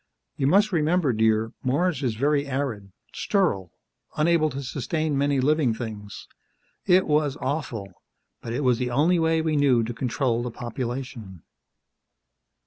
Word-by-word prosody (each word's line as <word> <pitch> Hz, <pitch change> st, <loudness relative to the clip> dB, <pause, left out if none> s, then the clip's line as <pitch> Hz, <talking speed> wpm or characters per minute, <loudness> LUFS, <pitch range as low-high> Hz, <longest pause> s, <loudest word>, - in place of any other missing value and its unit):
You 135 Hz, -, 0 dB
must 205 Hz, +7 st, +4 dB
remember, 160 Hz, -4 st, +2 dB
dear, 110 Hz, +1 st, +1 dB
Mars 145 Hz, +3 st, 0 dB
is 120 Hz, -5 st, -1 dB
very 140 Hz, +3 st, +1 dB
arid 130 Hz, -8 st, -3 dB, 0.2 s
sterile 130 Hz, -, 0 dB, 0.5 s
unable 155 Hz, 0 st, +3 dB
to 140 Hz, -1 st, -6 dB
sustain 150 Hz, +4 st, -2 dB
many 140 Hz, 0 st, +1 dB
living 140 Hz, -3 st, +2 dB
things. 105 Hz, -4 st, -7 dB, 0.6 s
It 185 Hz, +1 st, +5 dB
was 150 Hz, -2 st, +1 dB
awful, 115 Hz, -, -4 dB, 0.4 s
but 115 Hz, -, -6 dB
it 130 Hz, +5 st, -2 dB
was 125 Hz, -2 st, +2 dB
the 125 Hz, -1 st, -1 dB
only 155 Hz, +8 st, +2 dB
way 160 Hz, 0 st, +2 dB
we 160 Hz, -1 st, 0 dB
knew 135 Hz, -5 st, +3 dB
to 120 Hz, +2 st, -4 dB
control 120 Hz, 0 st, -1 dB
the 120 Hz, -, -3 dB
population." 120 Hz, -, -6 dB
135 Hz, 140 wpm, -25 LUFS, 115-155 Hz, 0.6 s, It